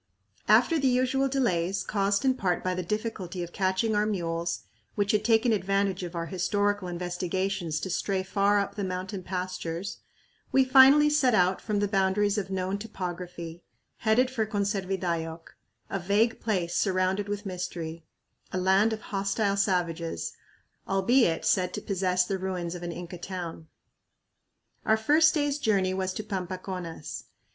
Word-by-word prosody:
After 330 -2 +5
the 275 - +2
usual 260 +2 +2
delays, 195 -9 0
caused 200 +3 0
in 260 - +4
part 185 -8 -1
by 185 - 0
the 180 - -2
difficulty 190 -2 -3
of 175 - -8
catching 190 +3 +1
our 210 +1 +2
mules, 170 -4 -2 0.3
which 205 -1 +1
had 210 0 +1
taken 225 +1 +3
advantage 195 -1 0
of 175 -1 -6
our 165 0 -2
historical 205 +3 0
investigations 180 -1 -2
to 190 - -3
stray 190 +2 -1
far 200 +2 +2
up 200 - -2
the 205 - -4
mountain 185 +1 -4
pastures, 180 0 -4 0.5
we 265 -1 +4
finally 270 +3 +7
set 265 -6 +3
out 185 0 +3
from 210 -2 -1
the 205 0 +1
boundaries 200 +1 +2
of 195 -1 -5
known 190 +1 -2
topography, 175 -5 -6 0.4
headed 245 +3 +2
for 235 -4 0
"Conservidayoc," 185 -5 -2 0.3
a 195 - -3
vague 205 +5 +2
place 180 -6 -1
surrounded 190 +1 +1
with 205 +1 -3
mystery; 170 -3 -5 0.5
a - - -2
land 190 +4 +3
of 215 - -5
hostile 200 +1 0
savages, 170 - -1 0.6
albeit 195 -1 +3
said 180 -1 +2
to - - -3
possess 185 -2 +1
the 190 +1 -2
ruins 180 -2 -3
of 175 - -7
an 175 0 -4
Inca 175 +1 -7
town. 175 -3 -6 1.2
Our 220 - +3
first 305 +8 +4
day's 290 -1 0
journey 195 -7 +2
was 190 0 -1
to 215 - -3
Pampaconas. 185 -5 -5
190 Hz, 150 wpm, -28 LUFS, 180-210 Hz, 1.2 s, finally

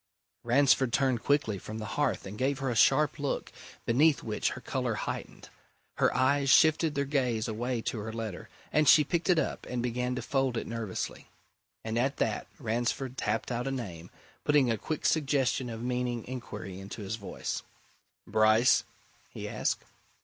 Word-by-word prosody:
Ransford 130 0 +4
turned 130 -3 +2
quickly 125 -9 +1
from 110 +4 -7
the 110 - -5
hearth - - 0
and 95 +2 -7
gave 135 +4 0
her 135 -2 -1
a - - -2
sharp 145 +6 +4
look, 140 -1 -2 0.3
beneath 145 +6 +3
which 110 -2 -1
her - - -8
colour - - -2
heightened. - - -5 0.5
Her - - +3
eyes 140 +1 +3
shifted 155 +1 +5
their 140 0 +1
gaze 125 -6 0
away 120 +2 -2
to 115 - -2
her 110 +2 -5
letter, 110 -5 -6 0.2
and 155 -1 +4
she 155 - +8
picked 170 +5 -1
it 180 - +5
up 155 - -2
and 125 -1 -2
began 125 +1 -1
to 125 - -4
fold 135 -3 0
it - - -2
nervously. 115 -4 -4 0.6
And 110 +1 -1
at 135 +3 0
that - - -1
Ransford 120 +1 -2
rapped - - -1
out 120 +2 -2
a - - -1
name, 90 -10 -6 0.3
putting 145 -5 +4
a 115 - 0
quick 155 -2 -4
suggestion 135 -4 +1
of 115 0 -6
meaning 125 -1 -2
inquiry 105 -7 -7
into 100 +2 -7
his 100 +3 -3
voice. 100 - -4 0.6
"Bryce?" 110 +3 +4 0.5
he - - -7
asked. - - -1
125 Hz, 170 wpm, -30 LUFS, 115-140 Hz, 0.6 s, she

